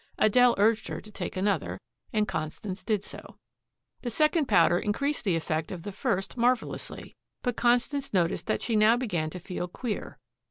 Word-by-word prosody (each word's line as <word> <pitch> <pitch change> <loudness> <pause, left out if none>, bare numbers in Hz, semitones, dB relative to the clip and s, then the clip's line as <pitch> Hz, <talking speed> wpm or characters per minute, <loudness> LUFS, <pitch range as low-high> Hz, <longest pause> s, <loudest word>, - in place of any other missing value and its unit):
Adele 245 +3 +5
urged 220 +2 +3
her - - -4
to 215 - -13
take 200 - -5
another, 175 - 0 0.3
and 215 -1 +1
Constance 185 +3 -4
did 210 -3 0
so. - - -9 0.6
The 245 - -3
second 305 +5 +2
powder 175 -4 +5
increased 280 +10 -1
the 190 -6 +2
effect 160 -1 -2
of 175 -3 -6
the 205 - -5
first 195 +2 -2
marvelously. 245 0 -1 0.3
But 245 -2 0
Constance 245 +4 +1
noticed 175 -4 +1
that - - 0
she 230 - 0
now 215 +2 +5
began 175 -11 -1
to 180 - -7
feel 180 0 -4
queer. 210 +4 -5
210 Hz, 170 wpm, -28 LUFS, 180-240 Hz, 0.6 s, Adele